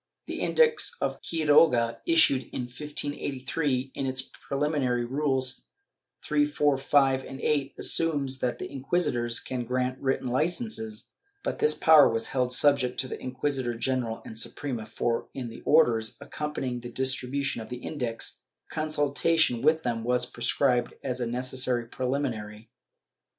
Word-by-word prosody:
The -, -, -5 dB
Index 470 Hz, -1 st, +3 dB
of -, -, -2 dB
Quiroga, 150 Hz, -7 st, +3 dB
issued 325 Hz, -, +4 dB
in -, -, -3 dB
1583, 140 Hz, 0 st, -3 dB
in 135 Hz, -, -3 dB
its 130 Hz, 0 st, -2 dB
preliminary 135 Hz, -4 st, -1 dB
rules 135 Hz, 0 st, -1 dB, 0.6 s
3, 295 Hz, -, +2 dB
4, 150 Hz, -, +2 dB
5 135 Hz, -1 st, +3 dB
and 135 Hz, -, -9 dB
8, 140 Hz, -2 st, 0 dB
assumes 140 Hz, -5 st, +3 dB
that 125 Hz, -1 st, -2 dB
inquisitors 130 Hz, -5 st, 0 dB
can 125 Hz, -2 st, -4 dB
grant 125 Hz, +1 st, -2 dB
written 130 Hz, -1 st, -1 dB
licences, 215 Hz, -, -1 dB, 0.4 s
but -, -, -3 dB
this 450 Hz, -, +4 dB
power 155 Hz, -3 st, +7 dB
was 115 Hz, 0 st, -2 dB
held 125 Hz, -2 st, 0 dB
subject 130 Hz, -1 st, +3 dB
to 130 Hz, -, -4 dB
the -, -, -7 dB
inquisitor 130 Hz, -1 st, -2 dB
general 120 Hz, -2 st, -2 dB
and 110 Hz, -, -6 dB
Suprema 120 Hz, -2 st, -3 dB
for, 115 Hz, +1 st, -2 dB
in 125 Hz, -3 st, -4 dB
the 115 Hz, -, -10 dB
orders 115 Hz, -8 st, +3 dB
accompanying 145 Hz, -3 st, -4 dB
the 120 Hz, 0 st, -8 dB
distribution 130 Hz, +1 st, -1 dB
of 110 Hz, -, -9 dB
the 125 Hz, 0 st, -7 dB
Index, 125 Hz, -7 st, -4 dB, 0.3 s
consultation 155 Hz, -3 st, +1 dB
with 155 Hz, +2 st, +3 dB
them 115 Hz, -2 st, -2 dB
was 125 Hz, +1 st, +1 dB
prescribed 120 Hz, +1 st, 0 dB
as 125 Hz, -2 st, -3 dB
a 120 Hz, -, -1 dB
necessary 125 Hz, 0 st, -1 dB
pre 125 Hz, +2 st, -4 dB
liminary.' 115 Hz, -6 st, -3 dB
130 Hz, 140 wpm, -27 LUFS, 125-145 Hz, 0.6 s, power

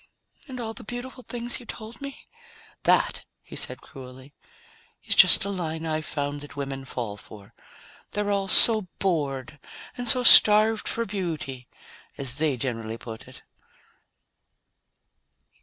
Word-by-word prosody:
"And 255 Hz, -2 st, -8 dB
all 225 Hz, -2 st, -5 dB
the -, -, -11 dB
beautiful 245 Hz, +3 st, -7 dB
things 240 Hz, 0 st, -3 dB
you 245 Hz, -, -15 dB
told 225 Hz, +4 st, -9 dB
me?" 275 Hz, -1 st, -9 dB, 0.6 s
"That," -, -, +2 dB, 0.2 s
he -, -, -12 dB
said -, -, -2 dB
cruelly, 130 Hz, +1 st, -13 dB, 0.7 s
"is -, -, +1 dB
just -, -, +7 dB
a -, -, -4 dB
line 165 Hz, -4 st, -4 dB
I've 155 Hz, -1 st, -3 dB
found 145 Hz, -1 st, -4 dB
that 145 Hz, -1 st, -12 dB
women 135 Hz, -1 st, -5 dB
fall 115 Hz, -5 st, -5 dB
for. 100 Hz, -1 st, -14 dB, 0.6 s
They're 205 Hz, 0 st, -1 dB
all 200 Hz, -1 st, -1 dB
so 215 Hz, +1 st, +4 dB
bored 145 Hz, -6 st, -2 dB, 0.4 s
and 245 Hz, -1 st, -2 dB
so 250 Hz, +1 st, +5 dB
starved 215 Hz, -1 st, +7 dB
for 230 Hz, -, -1 dB
beauty 160 Hz, -, -5 dB, 0.5 s
as 135 Hz, 0 st, +1 dB
they 150 Hz, -4 st, 0 dB
generally 115 Hz, -3 st, -4 dB
put 115 Hz, -1 st, -10 dB
it." -, -, -15 dB
160 Hz, 140 wpm, -25 LUFS, 135-220 Hz, 0.7 s, just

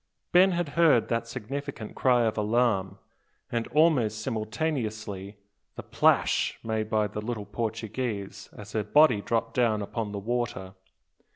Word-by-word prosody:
Ben 185 Hz, +1 st, +5 dB
had 175 Hz, -3 st, -1 dB
heard 155 Hz, -7 st, +3 dB
that 115 Hz, 0 st, -1 dB
significant 120 Hz, -1 st, -6 dB
cry 125 Hz, -2 st, +3 dB
of 110 Hz, -1 st, 0 dB
alarm, 105 Hz, -3 st, +1 dB, 0.5 s
and 115 Hz, -1 st, -1 dB
almost 140 Hz, -9 st, +2 dB
simultaneously 110 Hz, -5 st, -3 dB, 0.4 s
the -, -, -7 dB
"plash" -, -, +2 dB
made 110 Hz, -1 st, -2 dB
by 110 Hz, -1 st, +2 dB
the 105 Hz, +1 st, -5 dB
little 110 Hz, -1 st, -4 dB
Portuguese 110 Hz, -2 st, -4 dB
as 105 Hz, 0 st, -10 dB
her 110 Hz, -1 st, -1 dB
body 120 Hz, 0 st, +4 dB
dropped 115 Hz, +1 st, -1 dB
down 115 Hz, -3 st, +2 dB
upon 105 Hz, 0 st, -4 dB
the 100 Hz, -, -5 dB
water. 110 Hz, -3 st, -3 dB
110 Hz, 135 wpm, -27 LUFS, 105-125 Hz, 0.5 s, Ben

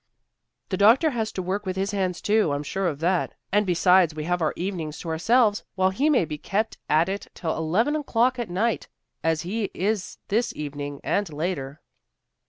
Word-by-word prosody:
"The 185 Hz, -, -1 dB
doctor 235 Hz, -, +5 dB
has 225 Hz, -3 st, -2 dB
to 185 Hz, -, -3 dB
work 195 Hz, +3 st, -2 dB
with 185 Hz, -2 st, -3 dB
his 195 Hz, +1 st, -1 dB
hands 185 Hz, -3 st, -1 dB
too, 210 Hz, -8 st, +3 dB
I'm 145 Hz, +1 st, -2 dB
sure 190 Hz, +5 st, -1 dB
of 150 Hz, -3 st, -3 dB
that. 180 Hz, +2 st, +1 dB, 0.2 s
And 205 Hz, 0 st, +2 dB
besides, 180 Hz, -2 st, +4 dB
we 155 Hz, -, -4 dB
have 175 Hz, +2 st, -1 dB
our 155 Hz, -, +2 dB
evenings 170 Hz, -5 st, -4 dB
to 170 Hz, -, -6 dB
ourselves, 210 Hz, +6 st, +3 dB
while 190 Hz, 0 st, +2 dB
he 275 Hz, +11 st, +1 dB
may 260 Hz, -, +3 dB
be 150 Hz, -1 st, -6 dB
kept 215 Hz, +7 st, -2 dB
at 155 Hz, +3 st, +4 dB
it 195 Hz, +1 st, -4 dB
till 160 Hz, -2 st, -2 dB
eleven 190 Hz, -, +1 dB
o'clock 255 Hz, -4 st, +1 dB
at 235 Hz, -5 st, -3 dB
night, 215 Hz, +6 st, 0 dB, 0.4 s
as 160 Hz, -1 st, +1 dB
he 210 Hz, +5 st, -2 dB
is 200 Hz, +1 st, -1 dB
this 230 Hz, +4 st, +1 dB
evening, 145 Hz, -1 st, -5 dB
and 200 Hz, -5 st, 0 dB
later." 150 Hz, -3 st, -3 dB
185 Hz, 190 wpm, -25 LUFS, 160-215 Hz, 0.4 s, doctor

